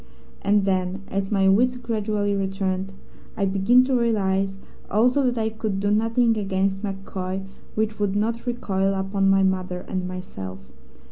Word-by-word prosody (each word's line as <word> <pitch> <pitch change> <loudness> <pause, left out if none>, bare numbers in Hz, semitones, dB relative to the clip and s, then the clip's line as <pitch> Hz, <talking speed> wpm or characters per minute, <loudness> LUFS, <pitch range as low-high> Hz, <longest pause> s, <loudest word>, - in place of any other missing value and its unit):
And 200 0 +3
then, 190 0 -1
as 195 +1 -2
my 195 -2 +3
wits 245 +6 +4
gradually 210 -4 -1
returned, 195 -1 -1 0.5
I 200 - +1
began 195 +6 +4
to 265 +1 -1
realize 195 -5 +1 0.3
also 245 +7 +3
that 245 -1 0
I 220 -1 +1
could 220 -3 -3
do 205 +1 +1
nothing 225 +2 +3
against 195 -1 0
MacCoy 195 -1 -4 0.3
which 215 0 -1
would 200 -1 0
not 230 +4 -1
recoil 195 -5 0
upon 195 0 +1
my 195 0 +4
mother 185 -1 -1
and 185 -1 -2
myself. 95 - -8
195 Hz, 150 wpm, -24 LUFS, 190-220 Hz, 0.5 s, wits